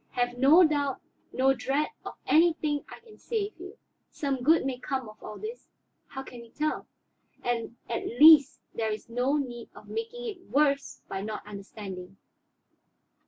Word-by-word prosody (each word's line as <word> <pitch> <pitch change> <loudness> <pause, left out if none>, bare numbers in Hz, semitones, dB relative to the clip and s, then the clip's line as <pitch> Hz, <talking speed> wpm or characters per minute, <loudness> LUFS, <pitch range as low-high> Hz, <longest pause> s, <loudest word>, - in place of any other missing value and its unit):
Have 245 0 0
no 280 +8 +7
doubt, 290 -4 +1 0.3
no 265 +1 +3
dread 275 +3 -1
of - - -7
anything 310 -2 +3
I - - -11
can 450 -2 -17
save 430 -3 -2
you. 375 +5 -10 0.3
Some 275 -3 -2
good 315 +3 +4
may 260 -2 -2
come 260 -1 -3
of 215 - -14
all 210 - -8
this, 455 +3 -7 0.4
how 270 -1 -7
can 245 -2 -10
we 235 - -14
tell? 305 +5 -2 0.6
And 235 -1 -2
at 230 - -3
least 290 +2 +7
there 225 -1 -1
is 215 +2 -6
no 250 +5 +1
need 240 -5 -5
of - - -14
making 460 +2 -5
it 420 -6 -5
worse 280 -1 +1
by 190 - -4
not 215 +1 -5
understanding. 195 -2 -8
270 Hz, 165 wpm, -28 LUFS, 235-315 Hz, 0.6 s, no